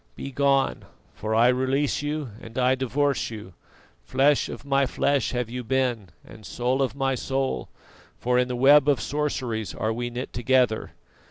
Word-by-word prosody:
Begone, 140 Hz, 0 st, 0 dB, 0.3 s
for 110 Hz, +1 st, -3 dB
I 120 Hz, +2 st, +5 dB
release 130 Hz, +3 st, +1 dB
you 145 Hz, -3 st, -3 dB
and 115 Hz, +2 st, -11 dB
I 130 Hz, 0 st, +3 dB
divorce 135 Hz, +2 st, 0 dB
you. 105 Hz, -5 st, -9 dB, 0.5 s
Flesh 140 Hz, +1 st, +2 dB
of -, -, -8 dB
my 140 Hz, -1 st, +2 dB
flesh 140 Hz, 0 st, +1 dB
have 125 Hz, -2 st, -2 dB
you 125 Hz, +2 st, -5 dB
been, 120 Hz, -5 st, -1 dB, 0.2 s
and 110 Hz, -, -14 dB
soul 125 Hz, +5 st, -1 dB
of 135 Hz, -1 st, -1 dB
my 135 Hz, -1 st, 0 dB
soul, 130 Hz, -, -2 dB, 0.5 s
for 125 Hz, 0 st, +1 dB
in 125 Hz, -, +2 dB
the 125 Hz, -, -3 dB
web 140 Hz, +3 st, +6 dB
of 140 Hz, -, +3 dB
sorceries 130 Hz, -7 st, -2 dB
are 110 Hz, +1 st, -1 dB
we 120 Hz, +1 st, -3 dB
knit 125 Hz, +2 st, -6 dB
together. 120 Hz, -2 st, +1 dB
130 Hz, 165 wpm, -25 LUFS, 120-135 Hz, 0.5 s, web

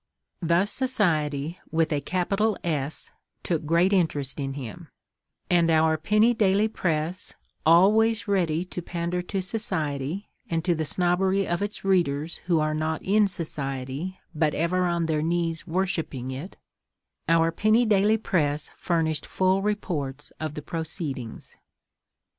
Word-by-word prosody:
Thus 175 Hz, +4 st, +2 dB
Society 165 Hz, -, 0 dB
with 160 Hz, 0 st, +1 dB
a 145 Hz, -, 0 dB
capital 195 Hz, +5 st, 0 dB
S 150 Hz, -3 st, -2 dB, 0.3 s
took 160 Hz, -3 st, -1 dB
great 170 Hz, +5 st, +3 dB
interest 150 Hz, -7 st, 0 dB
in 135 Hz, -1 st, -2 dB
him, 125 Hz, -8 st, -7 dB, 0.6 s
and 170 Hz, -2 st, +3 dB
our 160 Hz, 0 st, +4 dB
penny 210 Hz, +9 st, +3 dB
daily 205 Hz, -1 st, +3 dB
press, 170 Hz, -3 st, -2 dB, 0.3 s
always 210 Hz, +6 st, +5 dB
ready 175 Hz, -4 st, +1 dB
to 180 Hz, -, -6 dB
pander 175 Hz, +1 st, -2 dB
to 190 Hz, +1 st, -3 dB
Society, 180 Hz, -4 st, -2 dB, 0.2 s
and 165 Hz, 0 st, -1 dB
to 175 Hz, -, +3 dB
the 160 Hz, -1 st, -2 dB
snobbery 185 Hz, +4 st, +1 dB
of 175 Hz, +1 st, -1 dB
its 205 Hz, -1 st, -3 dB
readers 170 Hz, -5 st, +1 dB
who 170 Hz, -3 st, +3 dB
are 155 Hz, 0 st, +1 dB
not 155 Hz, +1 st, -2 dB
in 210 Hz, +2 st, +4 dB
Society 145 Hz, 0 st, -4 dB
but 155 Hz, -1 st, +1 dB
ever 180 Hz, +3 st, +1 dB
on 170 Hz, -1 st, 0 dB
their 155 Hz, -2 st, 0 dB
knees 165 Hz, +1 st, -1 dB
worshipping 165 Hz, -8 st, -2 dB
it—our 165 Hz, +2 st, -3 dB
penny 215 Hz, +7 st, +3 dB
daily 210 Hz, 0 st, +4 dB
press 150 Hz, -8 st, -1 dB
furnished 160 Hz, -3 st, -1 dB
full 190 Hz, +1 st, +2 dB
reports 160 Hz, -10 st, -3 dB
of 155 Hz, -1 st, -4 dB
the 150 Hz, -, -6 dB
proceedings. 155 Hz, -8 st, -5 dB
170 Hz, 135 wpm, -26 LUFS, 155-190 Hz, 0.6 s, always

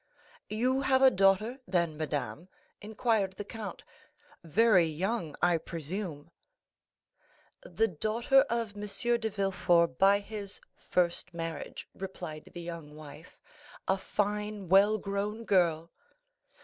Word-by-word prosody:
"You 255 Hz, +5 st, +1 dB
have 265 Hz, -1 st, +3 dB
a 265 Hz, -, +8 dB
daughter, 195 Hz, +6 st, +2 dB
then, 170 Hz, -4 st, +1 dB
madame?" 150 Hz, +3 st, -4 dB, 0.3 s
inquired 215 Hz, -2 st, 0 dB
the 205 Hz, -, -7 dB
count; 210 Hz, -3 st, -7 dB, 0.6 s
"very 190 Hz, +2 st, +4 dB
young, 170 Hz, +1 st, -2 dB
I 175 Hz, -2 st, +4 dB
presume?" 165 Hz, -1 st, -6 dB, 1.3 s
"The 360 Hz, -, 0 dB
daughter 225 Hz, -, +2 dB
of 230 Hz, -3 st, -1 dB
M. 205 Hz, -, -7 dB, 0.4 s
de 220 Hz, -1 st, -1 dB
Villefort 180 Hz, -7 st, +1 dB
by 195 Hz, +1 st, +6 dB
his 205 Hz, -1 st, -6 dB
first 175 Hz, -1 st, -1 dB
marriage," 165 Hz, -3 st, -5 dB
replied 175 Hz, -5 st, -7 dB
the 175 Hz, -, -5 dB
young 165 Hz, -3 st, -8 dB
wife, 155 Hz, +2 st, -12 dB, 0.5 s
"a 190 Hz, -, +3 dB
fine 210 Hz, -1 st, -2 dB
well 200 Hz, +3 st, +6 dB
grown 205 Hz, +3 st, -3 dB
girl." 170 Hz, -4 st, +2 dB
195 Hz, 115 wpm, -30 LUFS, 170-215 Hz, 1.3 s, a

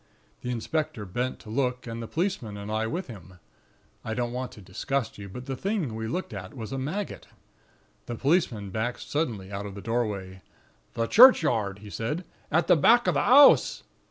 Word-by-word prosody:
The 125 Hz, -, -5 dB
inspector 125 Hz, -1 st, -2 dB
bent 125 Hz, +7 st, -3 dB
to 105 Hz, -, -10 dB
look, 125 Hz, 0 st, -1 dB
and 115 Hz, -1 st, -5 dB
the 115 Hz, -, -6 dB
policeman 155 Hz, -, -2 dB
and 100 Hz, +1 st, -6 dB
I 110 Hz, +1 st, 0 dB
with 175 Hz, +9 st, -3 dB
him. 95 Hz, -, -12 dB, 0.7 s
I 110 Hz, -, -3 dB
don't 120 Hz, 0 st, -1 dB
want 125 Hz, 0 st, -4 dB
to -, -, -13 dB
disgust 110 Hz, +6 st, -3 dB
you; 100 Hz, -1 st, -8 dB
but 125 Hz, +6 st, -8 dB
the 135 Hz, -, -3 dB
thing 190 Hz, -, -2 dB
we 110 Hz, 0 st, -4 dB
looked 180 Hz, +2 st, -4 dB
at 95 Hz, +1 st, -8 dB
was 110 Hz, 0 st, -6 dB
a 135 Hz, -, -3 dB
maggot. 170 Hz, +10 st, -4 dB, 0.8 s
The 120 Hz, -, -4 dB
policeman 120 Hz, -, 0 dB
backed 110 Hz, +5 st, -2 dB
suddenly 115 Hz, -11 st, -3 dB
out 100 Hz, +1 st, -4 dB
of 100 Hz, -, -9 dB
the -, -, -7 dB
doorway: 100 Hz, -5 st, -3 dB, 0.5 s
"'The 115 Hz, -1 st, 0 dB
churchyard,' 120 Hz, -, +6 dB
he 105 Hz, -, -9 dB
said, 150 Hz, -, -3 dB
'... -, -, -33 dB
at 160 Hz, 0 st, +3 dB
the -, -, +5 dB
back 235 Hz, +10 st, +5 dB
of -, -, +2 dB
the -, -, +1 dB
'ouse.' 280 Hz, +3 st, +6 dB
120 Hz, 195 wpm, -27 LUFS, 105-150 Hz, 0.8 s, churchyard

